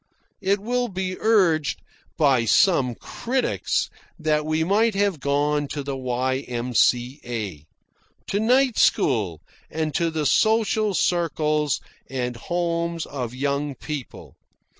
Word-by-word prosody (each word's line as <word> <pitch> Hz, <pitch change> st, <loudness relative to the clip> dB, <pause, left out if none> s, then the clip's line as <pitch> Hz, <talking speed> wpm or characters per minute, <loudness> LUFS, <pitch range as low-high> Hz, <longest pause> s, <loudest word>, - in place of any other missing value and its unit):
It 200 Hz, +1 st, +1 dB
will 245 Hz, +4 st, -1 dB
be 185 Hz, -2 st, -3 dB
urged 180 Hz, -9 st, +2 dB, 0.3 s
by 135 Hz, -7 st, +3 dB
some 125 Hz, -, +3 dB
critics 255 Hz, -, -1 dB, 0.3 s
that 155 Hz, -2 st, 0 dB
we 155 Hz, +1 st, +1 dB
might 210 Hz, +5 st, +2 dB
have 200 Hz, -5 st, +1 dB
gone 145 Hz, +1 st, +1 dB
to 145 Hz, 0 st, -4 dB
the 140 Hz, 0 st, -3 dB
Y.M.C.A., 125 Hz, -, -1 dB, 0.6 s
to 200 Hz, -, -1 dB
night 250 Hz, +2 st, +3 dB
school, 100 Hz, -, +2 dB, 0.3 s
and 155 Hz, -1 st, -2 dB
to 170 Hz, +4 st, +1 dB
the 160 Hz, -2 st, -2 dB
social 215 Hz, -, +2 dB
circles 155 Hz, -5 st, +1 dB, 0.3 s
and 125 Hz, -2 st, -3 dB
homes 170 Hz, +3 st, -2 dB
of 125 Hz, -3 st, -5 dB
young 140 Hz, +1 st, -1 dB
people. 145 Hz, 0 st, -7 dB
150 Hz, 115 wpm, -24 LUFS, 130-190 Hz, 0.6 s, by